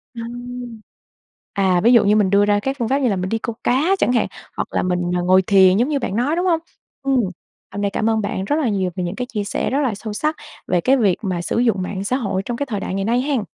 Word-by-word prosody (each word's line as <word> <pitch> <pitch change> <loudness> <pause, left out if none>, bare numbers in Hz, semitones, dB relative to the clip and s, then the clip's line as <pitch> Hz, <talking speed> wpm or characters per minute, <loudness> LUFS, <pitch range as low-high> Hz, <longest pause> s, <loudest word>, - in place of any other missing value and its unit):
Ừm. 240 0 -7 0.7
À, 190 -3 +2
ví 235 - +6
dụ 235 - +6
như 205 +1 +4
mình 205 -3 +3
đưa 200 +1 +4
ra 205 0 +2
các 270 +5 -2
phương 235 -3 -1
pháp 270 - +2
như 265 -3 +1
là 200 - 0
mình 185 0 -2
đi 225 - 0
câu 230 +1 -4
cá 310 +10 +2
chẳng 245 - +2
hạn, 240 - +2 0.3
hoặc - - -2
là - - 0
mình, 180 -1 0 0.2
ờ, 175 - 0
ngồi 185 +1 +4
thiền 190 -1 +5
giống 240 +6 +2
như 295 -2 0
bạn 205 -6 -3
nói, 270 +7 +1
đúng 355 +2 0
hông? 335 -3 +2 0.4
Ừm, 270 -2 +2 0.5
hôm 205 - -5
nay 200 - +1
cảm 215 +2 0
ơn 220 -1 +1
bạn 200 -2 -3
rất 290 - 0
là 305 -6 +1
nhiều 190 -4 0
về 180 - -2
những 175 +2 -3
cái 250 +3 -4
chia 210 -2 -2
sẻ - - -2
rất 275 - +1
là 255 -7 0
sâu 210 +2 -6
sắc 305 +9 -1 0.3
về 180 - +1
cái 265 +9 +3
việc 205 -8 +2
mà 185 -4 -2
sử 175 - -2
dụng 225 -6 +2
mạng 190 +1 -4
xã 250 +5 0
hội 200 -7 -2
trong 240 - -3
cái 285 - -2
thời 210 -6 -3
đại 185 - -4
ngày 195 0 -1
nay 235 +4 +2
hen. 275 -4 0
220 Hz, 290 wpm, -20 LUFS, 195-250 Hz, 0.7 s, ví